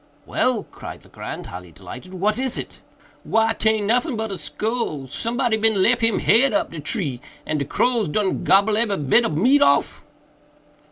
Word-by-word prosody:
"Well!" 245 -5 0
cried - - -10
Legrand, - - -8
highly 90 -1 -9
delighted, 125 - -11
"what 210 +5 0
is 260 -2 -1
it?" - - -8 0.4
"Why 225 0 +2
taint 220 -2 0
noffin 245 +6 +1
but 220 -1 -3
a 195 - -4
skull—somebody 225 - -2
bin 220 -2 +2
lef 240 +3 +3
him 225 -1 +2
head 260 +4 +3
up 310 0 0
de 165 - -7
tree, 145 - -2 0.2
and 155 - -1
de 140 - -2
crows 235 - +1
done 190 +5 -1
gobble 200 +2 +4
ebery 220 -3 +1
bit 150 - +3
ob 155 - -2
de - - 0
meat 270 +6 +4
off." 140 0 +2
220 Hz, 175 wpm, -22 LUFS, 165-235 Hz, 0.4 s, gobble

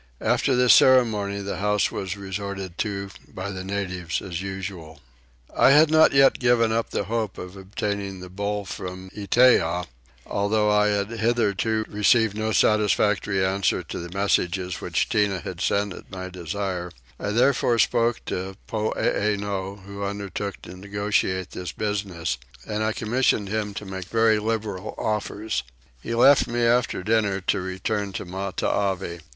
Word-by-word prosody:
After 135 - +2
this 125 0 +6
ceremony 105 -6 +4
the 100 0 -4
house 105 +1 +1
was 95 0 -4
resorted 95 -2 -5
to 100 -2 -3 0.2
by 95 +2 -6
the 95 -1 -6
natives 95 -3 -3
as 90 -2 -5
usual. 95 -5 -6 0.6
I - - +6
had 150 +3 +6
not 160 0 +6
yet 135 -1 +5
given 120 -2 +3
up 115 0 0
the - - -1
hope 110 0 -2
of 90 +1 -8
obtaining 100 0 -4
the 90 - -8
bull 100 +2 -3
from 95 0 -7
Itteah, 100 -5 +3 0.4
though 105 +1 +1
I 105 0 +4
had 100 +1 0
hitherto 110 -1 0
received 105 +1 +3
no 110 +1 -1
satisfactory 105 -2 +2
answer 95 0 0
to - - -6
the 85 0 -7
messages 90 -2 0
which - - 0
Tinah 100 -5 +1
had - - -6
sent 100 -1 +1
at - - -12
my 95 0 -6
desire: 90 0 -4 0.3
I - - -3
therefore 120 +1 +3
spoke 115 +1 +2
to 95 +1 -4
Poeeno 100 -2 -1
who 100 0 -7
undertook 100 0 -4
to 90 - -9
negotiate 100 -1 -1
this 90 -3 -5
business, 95 - -3 0.3
and 105 0 -3
I 110 - +1
commissioned 110 -2 +1
him 105 -1 -2
to 105 - -6
make 95 -2 -6
very 115 +1 +3
liberal 110 -2 -3
offers. 105 -1 -2 0.4
He 115 - -3
left 135 +4 +6
me 120 0 -1
after 120 -4 +2
dinner 105 -2 +1
to 95 +1 0
return 95 +2 -3
to - - -5
Matavai. 95 -1 -2
100 Hz, 150 wpm, -24 LUFS, 95-110 Hz, 0.6 s, this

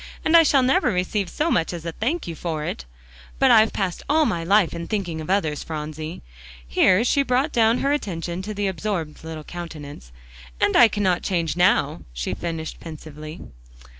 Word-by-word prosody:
And 315 - +4
I 335 - +10
shall 280 -4 +4
never 250 -1 +3
receive 185 +1 -1
so 315 - -1
much 165 - +1
as 170 -1 -7
a 165 - -2
thank 270 - -2
you 170 - -5
for 160 -2 -4
it. - - -5 0.5
But - - +4
I've 220 0 +6
passed 185 -3 -2
all 310 +1 +4
my 175 -9 -1
life 195 +1 +3
in 170 0 -5
thinking 180 -7 -3
of 155 - -8
others, 160 -7 0
Phronsie," 155 +1 -6 0.4
here 185 - +4
she 280 +3 +2
brought 270 +3 +1
down 230 -1 +3
her 280 +1 +2
attention 175 - -3
to 210 +3 -5
the 205 0 -1
absorbed 185 -5 -3
little 160 -1 -7
countenance, 150 - -9 0.5
"and - - +2
I 240 - +8
cannot 190 -5 0
change 170 -5 -1
now," 180 +1 +2
she - - -3
finished 165 -2 -5
pensively. 155 -1 -9
175 Hz, 185 wpm, -23 LUFS, 160-215 Hz, 0.5 s, I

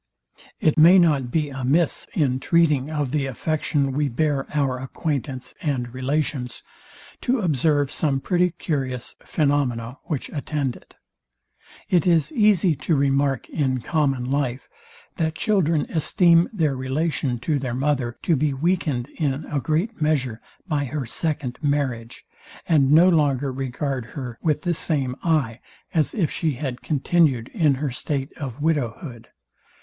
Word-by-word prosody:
It 155 0 +2
may 170 +4 +8
not 150 -8 +3
be 150 +2 0
amiss, 135 +5 0
in 130 -5 +1
treating 150 -4 +2
of 150 -4 -2
the 145 -2 0
affection 140 +1 -1
we 145 +1 0
bear 140 +2 0
our 135 -4 0
acquaintance 135 -1 -4
and 125 -6 -2
relations, 130 -1 -2 0.6
to 255 +1 +1
observe 150 - +1
some 140 -4 0
pretty 180 +5 +2
curious 135 -7 -4
phaenomena, 135 -5 -1
which 150 -6 -3
attend 145 -3 -2
it. - - -18 0.9
It 175 -1 +2
is 165 - +3
easy 210 - +3
to 165 - 0
remark 140 -1 +1
in 130 -5 -1
common 135 -4 0
life, 135 -2 -1 0.5
that 160 -3 -1
children 170 -6 +2
esteem 170 +1 +3
their 160 -10 0
relation 130 0 -1
to 150 0 0
their 125 -3 -3
mother 130 -3 -1
to 165 - +3
be 145 0 0
weakened, 150 -5 0
in 145 -1 -1
a 145 - -2
great 165 - -1
measure, 130 -7 0 0.3
by 150 -4 0
her 140 0 -3
second 145 0 -2
marriage, 135 -6 -2 0.4
and 145 -5 +4
no 165 +4 +7
longer 145 -6 +2
regard 130 0 -3
her 125 -4 -6
with 155 +1 0
the 175 -2 +1
same 140 -6 -1
eye, 140 -9 +1 0.3
as 155 -3 +1
if 180 -9 0
she 160 -3 0
had 130 -1 -5
continued 145 -5 +1
in 155 -9 +2
her 140 0 -2
state 135 +2 -3
of 140 -1 -6
widow 145 -8 +1
hood. 120 -7 -10
145 Hz, 145 wpm, -23 LUFS, 130-160 Hz, 0.9 s, may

